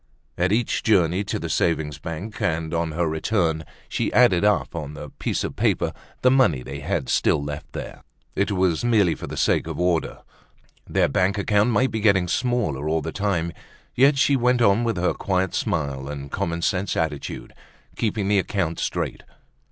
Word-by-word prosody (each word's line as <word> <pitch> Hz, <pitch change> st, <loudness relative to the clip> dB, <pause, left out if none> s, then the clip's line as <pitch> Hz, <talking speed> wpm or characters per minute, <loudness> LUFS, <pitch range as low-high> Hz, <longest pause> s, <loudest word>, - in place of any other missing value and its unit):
At 90 Hz, +2 st, +1 dB
each 115 Hz, +2 st, +1 dB
journey 95 Hz, -3 st, +2 dB
to -, -, -2 dB
the -, -, -4 dB
savings 75 Hz, -4 st, 0 dB
bank, 85 Hz, +9 st, -6 dB
on 80 Hz, 0 st, -1 dB
her 85 Hz, +1 st, 0 dB
return 80 Hz, +1 st, 0 dB
home, 80 Hz, -, -10 dB, 0.2 s
she -, -, -1 dB
added 110 Hz, -8 st, +5 dB
up 105 Hz, -4 st, +1 dB
on 75 Hz, -2 st, -5 dB
a 75 Hz, -, -8 dB
piece -, -, -2 dB
of -, -, -4 dB
paper -, -, +1 dB, 0.3 s
the 125 Hz, -, +6 dB
money 105 Hz, -, +3 dB
they 70 Hz, +1 st, -7 dB
had 75 Hz, -2 st, -2 dB
still -, -, +2 dB
left 75 Hz, 0 st, -6 dB
there. -, -, -7 dB, 0.3 s
It 100 Hz, 0 st, 0 dB
was 90 Hz, -3 st, +1 dB
merely 105 Hz, -8 st, +3 dB
for -, -, -7 dB
the -, -, -6 dB
sake -, -, +2 dB
of -, -, -5 dB
order. 90 Hz, -2 st, 0 dB, 0.7 s
Their -, -, +3 dB
bank 95 Hz, +6 st, +1 dB
account 105 Hz, +2 st, +2 dB
might 130 Hz, +2 st, +2 dB
be 110 Hz, -, -2 dB
getting 100 Hz, -4 st, +3 dB
smaller 100 Hz, -, 0 dB
all 80 Hz, -1 st, 0 dB
the -, -, -4 dB
time, 90 Hz, -5 st, -1 dB, 0.4 s
yet 135 Hz, +3 st, +4 dB
she 140 Hz, 0 st, +4 dB
went 125 Hz, -1 st, +2 dB
on 105 Hz, +2 st, +4 dB
with 115 Hz, -4 st, -1 dB
her 90 Hz, +1 st, +1 dB
quiet 95 Hz, -1 st, -1 dB
smile 70 Hz, -2 st, -2 dB
and 70 Hz, -1 st, -7 dB
common 85 Hz, -3 st, -2 dB
sense 95 Hz, 0 st, 0 dB
attitude, 80 Hz, -3 st, -3 dB, 0.4 s
keeping 105 Hz, -3 st, -1 dB
the 100 Hz, -1 st, +3 dB
account 90 Hz, -4 st, -2 dB
straight. -, -, -2 dB
90 Hz, 185 wpm, -23 LUFS, 80-105 Hz, 0.7 s, the